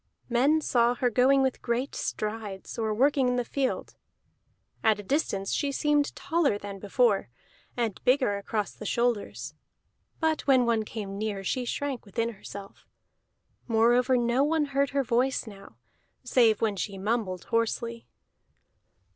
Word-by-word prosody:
Men 275 +6 +3
saw 240 -3 +2
her 245 -1 0
going 265 +4 +4
with 265 -1 -1
great 245 +3 -1
strides, 210 -1 -4
or 220 -1 0
working 265 +4 +3
in 250 - +1
the 245 -1 -1
field; 265 +2 -2 0.9
at 215 -1 +3
a - - -6
distance 195 -5 -1
she 285 -2 0
seemed 295 +1 +1
taller 320 -10 +1
than 200 -1 -8
before, 205 - +1 0.5
and 230 -5 -2
bigger 250 -6 +2
across 210 0 -2
the 215 - -8
shoulders; 180 - -1 0.7
but 320 -1 +1
when 260 -3 +5
one 225 -2 +1
came 200 -3 -6
near 210 -2 -3
she 250 +6 -1
shrank 270 0 -3
within 230 +3 -2
herself. 200 -2 -10 0.8
Moreover 240 +3 +3
no 240 +2 +2
one 305 +1 +2
heard 280 0 +2
her 280 0 0
voice 255 +2 +1
now, 195 - -13 0.5
save 235 -4 +3
when 215 -3 +1
she 195 0 -3
mumbled 195 -3 -2
hoarsely. 230 0 -2
235 Hz, 145 wpm, -28 LUFS, 210-265 Hz, 0.9 s, when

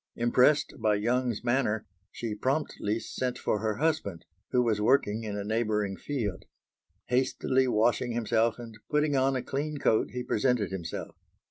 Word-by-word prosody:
Impressed 125 +5 +3
by 110 -2 +2
Young's 120 +2 0
manner, 120 -3 +1 0.3
she 115 -3 -4
promptly 115 -3 -1
sent 125 +2 -3
for 105 - 0
her 110 -1 -1
husband, 145 - -1 0.2
who 125 -1 +3
was 110 -3 +1
working 115 -2 +2
in 105 -2 -4
a 100 - -3
neighbouring 105 -2 0
field. 105 -7 -4 0.6
Hastily 130 +1 +2
washing 120 +1 +2
himself 115 0 +1
and 115 -2 -9
putting 150 -1 +2
on 135 0 +2
a 130 - -2
clean 150 +2 -3
coat 110 -5 +2
he 125 0 -4
presented 115 -4 +1
himself. 85 -3 -5
120 Hz, 150 wpm, -29 LUFS, 105-130 Hz, 0.6 s, Impressed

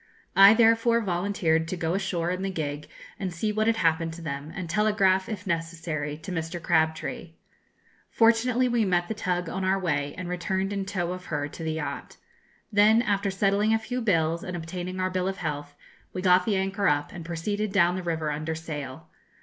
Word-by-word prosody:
I 195 +2 +9
therefore 230 0 +4
volunteered 175 -4 0
to 185 - -3
go 165 0 -1
ashore 180 -3 -1
in 185 +1 -3
the 195 - -1
gig 150 -5 -4 0.3
and 190 -2 -2
see 195 +6 -1
what 215 +1 0
had 230 - +3
happened 165 -4 +1
to 170 - -9
them, 140 0 -5
and 180 -3 -4
telegraph, 190 0 +2
if 205 -3 -5
necessary, 165 -4 -3
to 185 - -6
Mr. 165 0 -3
Crabtree. 160 +1 0 0.8
Fortunately, 235 +2 +3
we 240 -2 +2
met 175 -3 +1
the - - 0
tug 180 -4 -2
on 190 +3 -3
our 190 +1 +2
way, 145 -6 -1
and 180 -1 -5
returned 190 +2 -2
in 200 -1 -2
tow 180 -3 -2
of 185 0 -6
her 145 -4 -2
to 165 - -10
the 160 0 -1
yacht. 160 - -5 0.5
Then, 215 +3 +5
after 200 -3 0
settling 200 +3 +2
a - - +3
few 245 +3 -4
bills, 165 -6 +1
and 180 -1 -4
obtaining 180 +2 -5
our 185 0 0
bill 185 0 -1
of 195 0 -2
health, 145 -3 -4 0.4
we 185 - -4
got 180 0 +5
the 215 - +1
anchor 195 +1 0
up, 145 0 +1
and 170 - -8
proceeded 200 +5 -2
down 180 -3 +3
the 185 - -3
river 160 -3 -2
under 155 +2 -3
sail. 145 -5 -7
180 Hz, 200 wpm, -26 LUFS, 165-200 Hz, 0.8 s, I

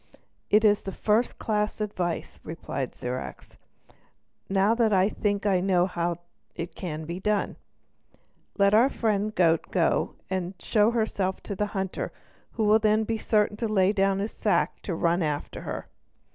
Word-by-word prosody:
"It 215 +1 +5
is 205 -1 +4
first 210 +4 0
class 210 -1 -1
advice," 185 -5 -3
replied 150 -5 -5
Zirac. 125 +1 -5 1.0
"Now 195 +3 +3
I 205 -4 +4
think 205 -1 -1
I 195 -3 +3
know 180 -1 +3
how 175 -2 -2 0.4
it 170 0 -5
can 160 -4 -5
be 170 +3 -5
done. 210 +1 0 1.0
Let 200 0 +4
our 235 +5 +6
friend 215 -5 0
the - - -11
goat 165 -2 +3
go - - +1
and 185 0 -3
show 210 +3 +3
herself 210 -5 -1
to 200 - -5
the 210 +2 -1
hunter, 190 -1 -3 0.4
who 225 - -1
will 215 +1 +5
then 215 0 +3
be 225 0 -2
certain 210 -1 +1
to 230 - -1
lay 200 -2 +3
down 195 -1 +2
the 200 +2 -1
sack 215 -1 0
to 180 - -3
run 170 +2 +1
after 150 -3 -3
her." - - -5
200 Hz, 160 wpm, -27 LUFS, 180-215 Hz, 1.0 s, our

